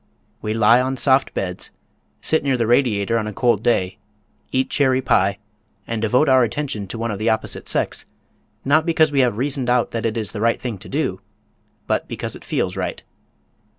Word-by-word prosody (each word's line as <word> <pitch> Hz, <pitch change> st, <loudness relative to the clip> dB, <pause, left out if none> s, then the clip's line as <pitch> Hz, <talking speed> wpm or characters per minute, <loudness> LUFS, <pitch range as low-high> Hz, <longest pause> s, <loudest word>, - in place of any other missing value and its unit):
We 110 Hz, 0 st, -2 dB
lie 115 Hz, +2 st, +5 dB
on 130 Hz, +1 st, -2 dB
soft 135 Hz, +2 st, +3 dB
beds, 90 Hz, -1 st, -3 dB, 0.5 s
sit 160 Hz, -, +1 dB
near 135 Hz, -2 st, +1 dB
the 115 Hz, -, +1 dB
radiator 115 Hz, -2 st, +2 dB
on 105 Hz, -, -3 dB
a 105 Hz, -, -5 dB
cold 120 Hz, -2 st, +2 dB
day, 110 Hz, -4 st, 0 dB, 0.5 s
eat 130 Hz, 0 st, +1 dB
cherry 130 Hz, -2 st, +2 dB
pie, 100 Hz, -6 st, +2 dB, 0.5 s
and 115 Hz, -1 st, -3 dB
devote 125 Hz, +7 st, +3 dB
our 130 Hz, -1 st, +5 dB
attention 115 Hz, -4 st, -3 dB
to 105 Hz, -, -6 dB
one 115 Hz, 0 st, -2 dB
of 100 Hz, -, -5 dB
the 110 Hz, +2 st, +1 dB
opposite 110 Hz, 0 st, -2 dB
sex, -, -, -2 dB, 0.6 s
not 155 Hz, +3 st, +4 dB
because 160 Hz, -2 st, +3 dB
we 140 Hz, -, +1 dB
have 125 Hz, -5 st, +2 dB
reasoned 130 Hz, -1 st, -1 dB
out 125 Hz, -1 st, +2 dB
that 115 Hz, 0 st, -1 dB
it 115 Hz, +1 st, -3 dB
is 110 Hz, -2 st, -2 dB
the 105 Hz, -, -5 dB
right 115 Hz, +1 st, +2 dB
thing 115 Hz, -6 st, -5 dB
to 105 Hz, -, -11 dB
do, 130 Hz, -11 st, -2 dB, 0.6 s
but -, -, -1 dB
because -, -, -5 dB
it -, -, -12 dB
feels -, -, -2 dB
right. -, -, -4 dB
120 Hz, 195 wpm, -21 LUFS, 110-130 Hz, 0.6 s, lie